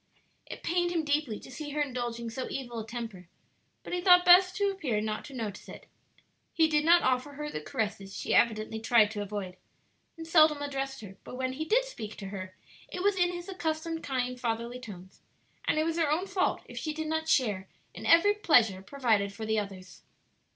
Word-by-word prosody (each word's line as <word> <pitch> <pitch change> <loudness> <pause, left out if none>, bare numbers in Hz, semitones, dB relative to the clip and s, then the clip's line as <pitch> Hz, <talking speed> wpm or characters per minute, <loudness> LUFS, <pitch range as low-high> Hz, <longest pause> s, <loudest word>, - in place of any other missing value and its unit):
It - - -9
pained 350 +1 +1
him 335 -2 0
deeply 290 -7 0
to - - -12
see 290 +3 -6
her 300 - -2
indulging 240 -3 -4
so 255 +3 -4
evil 240 -4 -5
a 220 - -7
temper, 225 -7 -7 0.6
but - - -7
he 355 - -1
thought 360 -1 +6
best 365 +1 +7
to 405 -1 +1
appear 280 - -2
not 215 0 -3
to 285 - -11
notice 215 -5 -6
it. - - -11 0.7
He 320 -1 +5
did 300 -1 +2
not 340 +2 +6
offer 255 +3 0
her 300 +1 -5
the 150 - -4
caresses 200 +2 -4
she - - -2
evidently 220 -1 +2
tried 220 -2 +4
to 210 -1 -4
avoid, 200 -2 -5 0.6
and 325 - -7
seldom 310 -2 +5
addressed 270 -2 -4
her; 195 -2 -11
but - - -9
when 260 0 -2
he 310 +4 -4
did - - +3
speak 220 - -7
to 195 - -7
her 185 -1 -7 0.3
it 360 - -5
was 405 0 +3
in 355 -1 +2
his 350 0 -7
accustomed 325 -3 -3
kind, 250 -3 -2
fatherly 235 +1 -3
tones, 190 -6 -11 0.5
and - - +2
it 310 - +3
was 330 +1 -1
her 320 -3 +2
own 335 +5 +1
fault 380 -1 0
if - - -8
she 310 - -3
did 315 +1 -4
not 320 0 -2
share 210 -10 +1 0.3
in - - -7
every 335 +5 +6
pleasure 235 - +3
provided 220 -4 0
for 220 +2 -7
the 220 0 +1
others. 190 -3 -8
260 Hz, 205 wpm, -29 LUFS, 220-325 Hz, 0.7 s, best